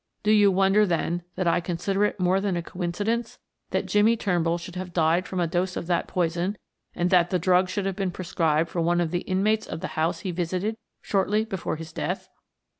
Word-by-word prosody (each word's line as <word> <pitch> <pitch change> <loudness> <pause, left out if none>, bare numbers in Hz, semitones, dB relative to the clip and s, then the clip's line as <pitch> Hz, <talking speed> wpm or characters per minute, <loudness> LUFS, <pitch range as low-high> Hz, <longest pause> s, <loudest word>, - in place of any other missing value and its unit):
"Do 210 - +3
you 205 -2 +6
wonder 195 +2 +4
then, 175 0 0
that 185 - -1
I 170 +1 +3
consider 180 +3 -1
it 210 - -2
more 185 +1 +2
than 195 -3 0
a 170 - -3
coincidence 205 +7 -2 0.3
that - - -1
Jimmie 215 +3 +3
Turnbull 175 -5 +1
should 175 +1 -9
have 180 -1 -6
died 170 +2 +2
from 185 - -3
a 175 - +2
dose 180 +3 -1
of - - -4
that 175 0 0
poison, 175 +3 -1 0.4
and 175 +2 0
that 175 -2 +4
the 185 - +1
drug 180 +1 +3
should 195 +1 -2
have 195 -1 -2
been 195 -2 0
prescribed 165 -3 0
for 170 - -1
one 175 +1 +2
of 170 -2 0
the 175 0 -1
inmates 210 +4 0
of - - -5
the - - -4
house 165 +2 0
he 185 - -3
visited 180 +5 -2 0.3
shortly 205 +2 +1
before 190 -7 -3
his 160 0 -9
death?" - - -3
180 Hz, 215 wpm, -25 LUFS, 170-195 Hz, 0.4 s, you